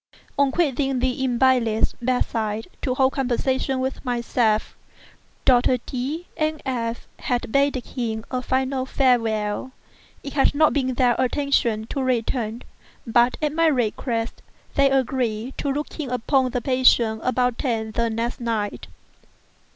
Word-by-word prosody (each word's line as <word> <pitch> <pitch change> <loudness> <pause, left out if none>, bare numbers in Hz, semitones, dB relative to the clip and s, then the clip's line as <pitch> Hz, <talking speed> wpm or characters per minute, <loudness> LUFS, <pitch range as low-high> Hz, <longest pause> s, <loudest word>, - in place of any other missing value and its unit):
On 280 -1 +3
quitting 275 -4 +1
the 255 +1 0
invalid's 245 -3 +2
bed 250 +1 +1
side 220 -1 -3
to 255 -2 -1
hold 265 0 +3
conversation 260 +1 0
with 260 +1 -3
myself, 235 -3 0 0.7
Doctors 250 0 +4
D—— 275 +7 -4
and 310 -1 -1
F—— 235 -3 -3
had 245 -3 -2
bidden 275 -2 +2
him 225 -3 -4
a 255 -1 -1
final 260 +1 -1
farewell. 230 -3 +1 0.5
It 280 - -6
had 285 0 +2
not 310 +1 +4
been 260 -3 0
their 245 -1 +3
intention 255 -4 +1
to 275 - -2
return; 240 -2 -1 0.4
but, 240 +1 +3
at 300 -1 +1
my 330 +1 +3
request, 235 -3 -1 0.3
they 275 0 +4
agreed 255 -3 -1
to 285 - -1
look 295 +4 -4
in 285 -4 -3
upon 255 +2 +1
the 245 0 -2
patient 240 -4 +3
about 250 -1 +1
ten 225 -4 -1
the 235 +1 0
next 230 +2 -2
night. 225 -4 -3
255 Hz, 140 wpm, -23 LUFS, 230-270 Hz, 0.7 s, Doctors